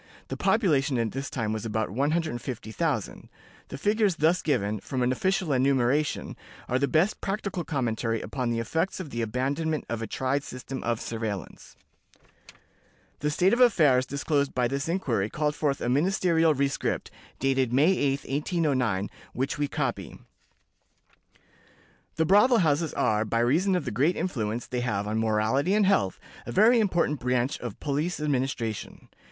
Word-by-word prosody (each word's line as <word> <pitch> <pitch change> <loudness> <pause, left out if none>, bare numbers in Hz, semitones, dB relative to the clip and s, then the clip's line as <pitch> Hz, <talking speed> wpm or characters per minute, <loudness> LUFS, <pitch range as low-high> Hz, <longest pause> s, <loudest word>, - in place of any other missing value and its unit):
The - - -3
population 150 - +2
at 115 -2 0
this 135 +2 -4
time 110 -4 -2
was 110 -1 -4
about 110 -2 -2
150,000. 140 - -2 0.4
The - - -7
figures 205 +3 +2
thus 160 +4 +2
given, 105 -8 0
from 125 +5 -3
an 125 - +2
official 185 +2 0
enumeration, 135 +2 +1 0.3
are 125 - +1
the 140 - +1
best 160 +9 +1
practical 195 -3 -3
commentary 115 -6 -1
upon 125 0 -3
the 115 - -1
effects 160 +13 -1
of 165 -7 -7
the 120 - -3
abandonment 140 +7 -1
of 115 -1 -3
a 115 - -3
tried 130 +5 -1
system 130 0 -7
of 115 -1 -1
surveillance. 110 -4 -5 1.4
The 150 - 0
state 180 +7 +2
of 240 - +2
affairs 150 - +4
disclosed 140 0 -1
by 125 -1 +2
this 140 +4 -3
inquiry 120 - 0
called 150 +2 -1
forth 150 -2 -1
a - - -1
ministerial 165 +3 +2
rescript, 140 +1 -1 0.3
dated 135 -2 +1
May 145 +8 +4
8, 140 -3 0
1809, 135 - 0 0.3
which 135 +3 -2
we 145 - +1
copy: - - -3 2.0
"The 160 - +1
brothel 210 +8 +5
houses 155 +1 +1
are, 105 0 +2
by 110 +1 -2
reason 160 +12 +2
of 180 - -1
the 125 - -3
great 145 +11 +2
influence 115 -9 -2
they 125 -1 -3
have 105 -4 -1
on 110 +1 -1
morality 115 - +1
and 210 -1 +4
health, 100 - +2 0.3
a - - -4
very 230 +5 +5
important 175 -8 +1
branch 125 +2 0
of 120 -4 -7
police 150 +4 -2
administration. 130 -7 -2
140 Hz, 155 wpm, -27 LUFS, 120-160 Hz, 2.0 s, brothel